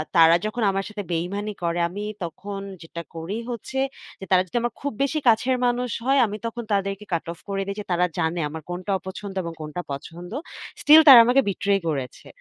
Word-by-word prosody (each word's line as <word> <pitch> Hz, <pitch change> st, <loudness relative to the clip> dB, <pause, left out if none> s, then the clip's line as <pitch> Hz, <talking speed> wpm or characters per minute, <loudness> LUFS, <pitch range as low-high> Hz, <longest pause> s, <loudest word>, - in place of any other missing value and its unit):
তারা 165 Hz, 0 st, +7 dB
যখন 225 Hz, +2 st, -2 dB
আমার 195 Hz, 0 st, -1 dB
সাথে 210 Hz, -1 st, -6 dB
বেইমানি 195 Hz, +5 st, -2 dB
করে, 170 Hz, 0 st, 0 dB
আমি 205 Hz, +4 st, -6 dB, 0.2 s
তখন 195 Hz, +4 st, -6 dB, 0.2 s
যেটা 165 Hz, +1 st, -7 dB
করি 165 Hz, +7 st, -4 dB
হচ্ছে, 240 Hz, +3 st, -6 dB, 0.4 s
যে, 190 Hz, -, -7 dB
তারা 185 Hz, -1 st, +6 dB
যদি 240 Hz, -, -3 dB
আমার 240 Hz, -1 st, -2 dB
খুব 285 Hz, -, -2 dB
বেশি 305 Hz, +3 st, 0 dB
কাছের 245 Hz, +3 st, +4 dB
মানুষ 245 Hz, 0 st, 0 dB, 0.2 s
হয়, 270 Hz, +1 st, +4 dB
আমি 210 Hz, -1 st, -4 dB
তখন 235 Hz, +1 st, -4 dB
তাদেরকে 195 Hz, +1 st, -1 dB
কাট 165 Hz, -, -1 dB
অফ 170 Hz, -, -19 dB
করে 195 Hz, 0 st, -1 dB
দেই 200 Hz, -, -3 dB
যে, -, -, -4 dB
তারা 175 Hz, +1 st, +3 dB
জানে 165 Hz, +1 st, 0 dB
আমার 160 Hz, +1 st, -7 dB
কোনটা 185 Hz, +3 st, -4 dB
অপছন্দ 195 Hz, +1 st, -8 dB
এবং 170 Hz, 0 st, -5 dB
কোনটা 155 Hz, +3 st, -5 dB
পছন্দ। 170 Hz, +6 st, -7 dB, 0.5 s
স্টিল 305 Hz, +2 st, +9 dB
তারা 260 Hz, -4 st, +12 dB
আমাকে 250 Hz, +3 st, +4 dB
বিট্রে 200 Hz, +1 st, 0 dB, 0.2 s
করেছে। 135 Hz, -5 st, -4 dB
195 Hz, 200 wpm, -24 LUFS, 170-230 Hz, 0.5 s, তারা